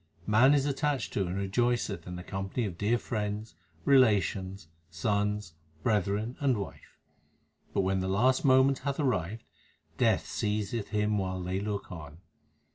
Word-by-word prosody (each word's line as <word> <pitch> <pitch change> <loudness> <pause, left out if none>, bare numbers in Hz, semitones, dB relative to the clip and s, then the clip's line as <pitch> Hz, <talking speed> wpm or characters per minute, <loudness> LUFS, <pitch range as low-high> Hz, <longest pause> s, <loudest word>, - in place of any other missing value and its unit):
Man 125 +7 +5
is 140 -1 +2
attached 145 -1 -1
to 95 -3 0
and 90 - -3
rejoiceth 100 -2 0
in 90 - -5
the 90 - -7
company 95 +5 -3
of 95 -4 -4
dear 105 +6 +1
friends, 105 -3 -3 0.3
relations, 100 - +3 0.2
sons, 105 +2 -1 0.3
brethren, 105 +2 0
and 135 -5 +2
wife; 100 - -8 0.7
But - - +1
when 95 0 +1
the 95 - -2
last 125 +7 +2
moment 130 0 +5
hath 140 0 -3
arrived, 110 - -1 0.6
Death - - +3
seizeth 105 +1 -2
him 105 -1 +1
while 95 -1 -2
they 90 +2 -2
look 100 0 -4
on. 75 -3 -9
105 Hz, 145 wpm, -30 LUFS, 95-120 Hz, 0.7 s, Man